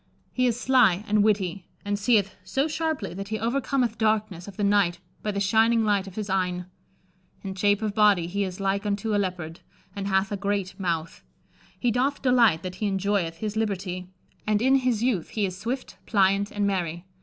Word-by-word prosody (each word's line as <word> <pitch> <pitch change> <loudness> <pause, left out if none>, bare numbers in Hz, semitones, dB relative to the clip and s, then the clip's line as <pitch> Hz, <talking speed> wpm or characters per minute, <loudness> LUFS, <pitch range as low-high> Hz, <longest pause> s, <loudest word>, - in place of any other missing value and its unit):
He 255 0 +2
is 235 -2 0
slye 245 -7 +3
and 210 -1 +3
wittie, 195 -4 0 0.2
and 205 0 -1
seeth 205 -2 +2
so 270 +10 0
sharpely 310 - -2
that 195 +2 -6
he 220 +1 -2
overcommeth 240 +1 0
darkness 215 -5 0
of 200 - -10
the 205 - -1
nighte 200 -4 +3 0.2
by 215 - -3
the 200 -1 -1
shyninge 225 +3 +3
lyghte 200 -2 +1
of 190 - -10
his 215 -2 -3
eyne. 180 -2 -1 0.8
In 195 -1 -4
shape 205 +2 +1
of 210 -2 -1
body 205 -5 +4
he 200 +4 -1
is 185 -1 -5
like 195 +1 0
unto 210 +1 -1
a 205 - +2
Leoparde, 180 -4 -3 0.4
and 200 -1 -3
hathe 190 +1 +1
a 205 - -1
greate 200 -1 -2
mouthe. 165 -3 -2 0.6
He 245 - +1
doth 265 +5 0
delighte 240 -10 +4
that 185 0 -5
he 210 - +1
enjoyeth 195 -3 0
his 215 -1 -3
libertie; 185 -4 -2 0.4
and 210 -1 +2
in 265 +4 +4
his 250 -4 0
youth 225 -10 0
he 210 -2 -1
is 185 -2 -4
swifte, 250 +3 -4
plyante, 200 -1 +3
and 205 -1 0
merye. 175 -3 -2
205 Hz, 195 wpm, -26 LUFS, 190-220 Hz, 0.8 s, body